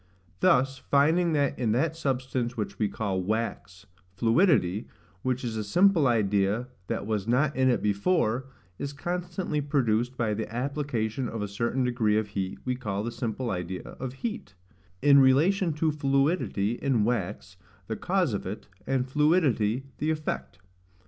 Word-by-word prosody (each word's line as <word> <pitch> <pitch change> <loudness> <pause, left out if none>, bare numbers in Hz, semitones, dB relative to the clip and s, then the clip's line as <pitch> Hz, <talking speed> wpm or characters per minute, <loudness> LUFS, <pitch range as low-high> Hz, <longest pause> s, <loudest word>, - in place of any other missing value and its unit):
Thus, 135 +4 +3
finding 160 +4 +3
that 145 -2 +1
in 115 -4 +1
that 155 +7 +1
substance 130 -5 -2
which 105 - -4
we 105 -2 +1
call 95 -4 -2
wax, 100 -2 -3 0.3
fluidity, 115 - +2 0.3
which 130 +2 -1
is 115 -2 -3
a 110 - -2
simple 175 - +4
idea 105 +1 +1 0.2
that - - -2
was 105 -2 -2
not 140 +5 +2
in 130 0 +3
it 120 - +1
before, 110 - +1 0.3
is 140 0 -4
constantly 175 0 -3
produced 125 -4 0
by 115 -3 0
the 110 0 -4
application 125 -2 -2
of 115 -2 -4
a - - -2
certain 115 +6 -1
degree 120 -4 +1
of 110 -1 -1
heat 95 -2 -3
we 125 - 0
call 105 -5 -3
the 120 - -3
simple 120 +1 -3
idea 90 0 -4
of 130 -1 -7
heat, 215 - -5 0.5
in 140 -1 +7
relation 165 +8 +4
to 155 +1 +1
fluidity 135 - 0
in 130 -6 +2
wax, 100 -5 -2 0.3
the 110 - -3
cause 180 - 0
of 100 - -3
it, 100 +3 -6 0.2
and 130 -1 0
fluidity 135 - +2 0.2
the 155 - 0
effect. 155 - -3
125 Hz, 155 wpm, -27 LUFS, 110-145 Hz, 0.5 s, in